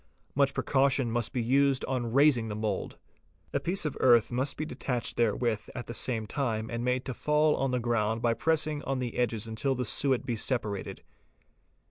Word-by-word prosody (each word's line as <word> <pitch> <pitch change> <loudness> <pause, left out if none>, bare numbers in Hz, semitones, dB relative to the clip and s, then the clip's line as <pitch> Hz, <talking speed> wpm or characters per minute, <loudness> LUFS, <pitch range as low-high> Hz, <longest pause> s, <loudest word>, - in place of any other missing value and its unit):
Much 140 0 +2
precaution 135 -3 +2
must 120 -1 -1
be 125 - -1
used 135 +2 +2
on 120 -3 -2
raising 135 -3 +4
the 105 - -4
mould. 105 -2 -3 0.6
A - - +1
piece 175 +5 -2
of 150 - -2
earth 120 -3 +5
must 130 +3 -1
be 155 - -2
detached 125 -3 -3
therewith 115 -1 0
at 125 - -5
the 120 - -6
same 115 -1 -1
time 110 -2 -2
and 115 0 -3
made 125 +1 0
to 130 - -3
fall 150 +3 +2
on 135 - 0
the 125 0 0
ground 115 -2 0
by 115 0 +2
pressing 155 +2 0
on 135 - -1
the 125 -2 -3
edges 115 -3 0
until 130 +5 -1
the 125 0 -2
suet 130 +3 +1
be 120 - -1
separated. 110 -4 -3
125 Hz, 190 wpm, -29 LUFS, 115-135 Hz, 0.6 s, earth